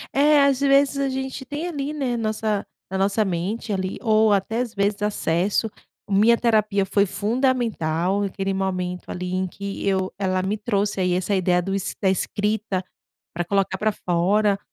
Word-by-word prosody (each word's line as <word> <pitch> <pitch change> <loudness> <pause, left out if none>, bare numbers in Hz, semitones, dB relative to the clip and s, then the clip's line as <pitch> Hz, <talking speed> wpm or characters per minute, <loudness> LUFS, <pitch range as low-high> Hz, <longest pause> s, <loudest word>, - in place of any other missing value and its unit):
É, 290 +1 +5
às 275 -2 +3
vezes, 280 0 +3
a 275 -1 +1
gente 265 0 -4
tem 295 +6 -4
ali, 290 -4 -3
né, 270 -5 -1
nossa 215 -2 -1 0.3
na 190 - -1
nossa 200 +2 +2
mente 195 +5 -2
ali, 190 -1 -2
ou 220 -1 +4
até, 205 +3 +1
às 245 -2 -2
vezes, 200 +1 0
acesso 205 0 0 0.4
minha 210 +4 +4
terapia 215 -4 +2
foi 200 +1 +2
fundamental 205 -6 0
naquele 195 -1 -2
momento, 185 -2 -3
ali, 180 0 -4
em 185 0 0
que 200 +2 -5
eu 190 -1 0
ela 185 -1 0
me 195 +3 0
trouxe 205 -2 -1
aí 180 -1 +1
essa 185 +3 -1
ideia 180 -2 +2
do 195 - -4 0.3
da 195 - +2
escrita, 205 0 -1 0.5
para 175 +1 -1
colocar 195 +1 0
para 215 +2 0
fora. 195 +3 +1
205 Hz, 165 wpm, -23 LUFS, 190-230 Hz, 0.5 s, É